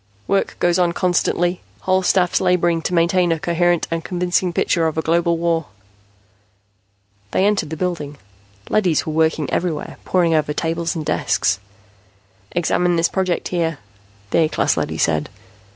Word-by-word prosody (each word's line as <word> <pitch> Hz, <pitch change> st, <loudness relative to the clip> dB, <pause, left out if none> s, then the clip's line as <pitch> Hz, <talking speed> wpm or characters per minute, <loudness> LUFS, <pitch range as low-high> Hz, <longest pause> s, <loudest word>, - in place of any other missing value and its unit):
"Work 195 Hz, 0 st, 0 dB
goes 175 Hz, +1 st, +2 dB
on 175 Hz, -1 st, +2 dB
constantly, 175 Hz, 0 st, 0 dB, 0.2 s
whole 185 Hz, 0 st, +2 dB
staffs 180 Hz, -1 st, +2 dB
laboring 175 Hz, -2 st, +2 dB
to 180 Hz, -, -3 dB
maintain 175 Hz, +1 st, +3 dB
a 165 Hz, -, +1 dB
coherent 175 Hz, +1 st, +1 dB
and 165 Hz, -1 st, -2 dB
convincing 180 Hz, 0 st, 0 dB
picture 170 Hz, -1 st, +1 dB
of 160 Hz, -, -4 dB
a 160 Hz, -, 0 dB
global 170 Hz, +1 st, +2 dB
war." 165 Hz, -2 st, 0 dB, 1.6 s
They 190 Hz, -, +1 dB
entered 205 Hz, -6 st, +1 dB
the 160 Hz, -, -5 dB
building. 155 Hz, -5 st, -3 dB, 0.5 s
Leadys 180 Hz, -7 st, +1 dB
were 155 Hz, -, -3 dB
working 160 Hz, -2 st, +1 dB
everywhere, 170 Hz, -3 st, -2 dB
poring 175 Hz, -3 st, +2 dB
over 150 Hz, -1 st, +1 dB
tables 165 Hz, +2 st, -2 dB
and 155 Hz, -2 st, -4 dB
desks. 100 Hz, -7 st, +1 dB, 0.9 s
"Examine 175 Hz, +1 st, +1 dB
this 165 Hz, 0 st, +2 dB
project 185 Hz, -2 st, -1 dB
here," 165 Hz, -3 st, -1 dB, 0.5 s
the -, -, +3 dB
A 160 Hz, -2 st, +3 dB
class -, -, +1 dB
leady -, -, -2 dB
said. -, -, 0 dB
170 Hz, 150 wpm, -20 LUFS, 165-180 Hz, 1.6 s, maintain